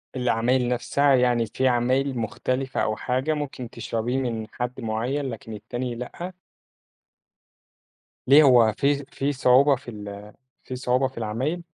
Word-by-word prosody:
العمايل 125 Hz, 0 st, +1 dB
نفسها، 135 Hz, +3 st, +2 dB
يعني 120 Hz, -2 st, +2 dB
في 130 Hz, +5 st, -1 dB
عمايل 130 Hz, +2 st, +1 dB
مختلفة، 130 Hz, +4 st, -2 dB
أو 110 Hz, -, 0 dB
حاجة 130 Hz, +7 st, -1 dB
ممكن 140 Hz, -5 st, -5 dB
تشربيه 115 Hz, +4 st, -3 dB
من 115 Hz, -4 st, -2 dB
حد 125 Hz, +1 st, -4 dB
مُعيّن، 115 Hz, +6 st, -2 dB
لكن 115 Hz, -1 st, -8 dB
التاني 120 Hz, +3 st, -5 dB
لأ؟ 170 Hz, +9 st, -7 dB, 1.9 s
ليه 145 Hz, +4 st, +8 dB
هو 120 Hz, -5 st, +6 dB
في 140 Hz, 0 st, +1 dB
في 140 Hz, +1 st, -2 dB
صعوبة 135 Hz, +2 st, +5 dB
في 125 Hz, -1 st, -10 dB
ال 105 Hz, -1 st, -9 dB, 0.3 s
في 130 Hz, -, -6 dB
صعوبة 125 Hz, +1 st, +1 dB
في 130 Hz, -, -15 dB
العمايل؟ 130 Hz, +11 st, -2 dB
125 Hz, 135 wpm, -24 LUFS, 115-135 Hz, 1.9 s, ليه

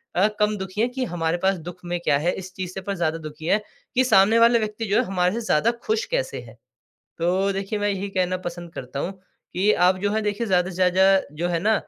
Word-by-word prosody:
अ, 190 Hz, +4 st, +4 dB
कम 210 Hz, 0 st, +2 dB
दुखी 190 Hz, +2 st, -4 dB
हैं 240 Hz, -, +2 dB
कि, 260 Hz, +1 st, -3 dB
"हमारे 165 Hz, -2 st, -1 dB
पास 195 Hz, 0 st, +3 dB
दुख 175 Hz, -, -7 dB
में 175 Hz, 0 st, -2 dB
क्या 140 Hz, -, +3 dB
है?" 175 Hz, +4 st, +1 dB
इस 185 Hz, 0 st, -8 dB
चीज़ 185 Hz, -1 st, -4 dB
से 190 Hz, -, -5 dB
पर 200 Hz, -1 st, -3 dB
ज़्यादा 165 Hz, -2 st, 0 dB
दुखी 155 Hz, 0 st, -9 dB
हैं 205 Hz, +5 st, +3 dB, 0.4 s
कि 255 Hz, -, +4 dB
"सामने 225 Hz, -2 st, +5 dB
वाले 235 Hz, 0 st, +6 dB
व्यक्ति 215 Hz, +1 st, -3 dB
जो 200 Hz, +1 st, 0 dB
है 250 Hz, -, +3 dB
हमारे 180 Hz, 0 st, +1 dB
से 235 Hz, -, -2 dB
ज़्यादा 225 Hz, +8 st, +3 dB
खुश 440 Hz, +2 st, +1 dB
कैसे -, -, -1 dB
हैं?" -, -, -14 dB, 0.6 s
तो 185 Hz, +4 st, +1 dB
देखिए, 195 Hz, +2 st, -3 dB
मैं 205 Hz, -, +1 dB
यही 200 Hz, 0 st, -3 dB
कहना 185 Hz, -1 st, 0 dB
पसंद 175 Hz, -1 st, -6 dB
करता 135 Hz, +2 st, -6 dB
हूँ 180 Hz, -, -2 dB, 0.4 s
कि 200 Hz, +4 st, +3 dB, 0.2 s
आप 185 Hz, 0 st, +3 dB
जो 205 Hz, -, +1 dB
है 220 Hz, +1 st, 0 dB
देखिए 210 Hz, +2 st, -2 dB
ज़्यादा 180 Hz, -1 st, +2 dB
से 180 Hz, -, -8 dB
ज़्यादा 190 Hz, +1 st, +4 dB, 0.2 s
जो 175 Hz, -, +1 dB
है 170 Hz, -1 st, 0 dB
ना, 215 Hz, +5 st, +2 dB
190 Hz, 250 wpm, -23 LUFS, 175-210 Hz, 0.6 s, वाले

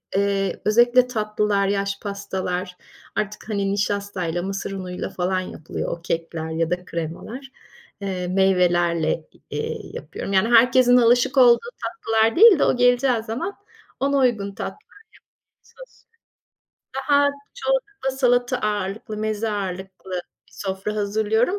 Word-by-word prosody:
eee, 195 Hz, -1 st, 0 dB
özellikle 240 Hz, +3 st, +5 dB
tatlılar, 210 Hz, -3 st, 0 dB
yaş 200 Hz, 0 st, -1 dB
pastalar, 190 Hz, -3 st, -4 dB, 0.4 s
artık, 210 Hz, +1 st, -4 dB
hani, 200 Hz, -2 st, 0 dB
nişastayla 200 Hz, -4 st, -2 dB
mısır 195 Hz, 0 st, -4 dB
unuyla 185 Hz, -2 st, -5 dB
falan 185 Hz, +1 st, -1 dB
yapılıyor, 160 Hz, -3 st, -5 dB
o -, -, -21 dB
kekler 165 Hz, -1 st, -3 dB
ya 165 Hz, 0 st, 0 dB
da 180 Hz, 0 st, -2 dB
kremalar. 200 Hz, -, -6 dB, 0.5 s
Eee, 185 Hz, -2 st, -3 dB
meyvelerle, 175 Hz, -4 st, +2 dB, 0.2 s
eee, -, -, -3 dB, 0.2 s
yapıyorum. 195 Hz, -, -6 dB
Yani, 195 Hz, +5 st, +3 dB
herkesin 250 Hz, +1 st, +6 dB
alışık 245 Hz, +3 st, +3 dB
olduğu 250 Hz, -, +6 dB
tatlılar 225 Hz, -, +1 dB
değil 420 Hz, -5 st, +8 dB
de, -, -, +4 dB
o -, -, +3 dB
geleceği 245 Hz, -1 st, +3 dB
zaman 235 Hz, -, -4 dB, 0.4 s
ona 280 Hz, +1 st, +1 dB
uygun 215 Hz, -7 st, +1 dB
tatlılar -, -, -5 dB, 0.7 s
yapmaya -, -, -28 dB
çalışıyorum. -, -, -15 dB, 1.0 s
Daha, 285 Hz, 0 st, +5 dB, 0.3 s
çoğunlukla 415 Hz, -, -1 dB
salata 245 Hz, -1 st, +2 dB
ağırlıklı, 210 Hz, 0 st, -3 dB
meze 215 Hz, +1 st, -2 dB
ağırlıklı 190 Hz, -1 st, -5 dB, 0.4 s
bir -, -, -25 dB
sofra 195 Hz, +2 st, -4 dB
hazırlıyorum 220 Hz, -, +1 dB
205 Hz, 125 wpm, -23 LUFS, 190-245 Hz, 1.0 s, değil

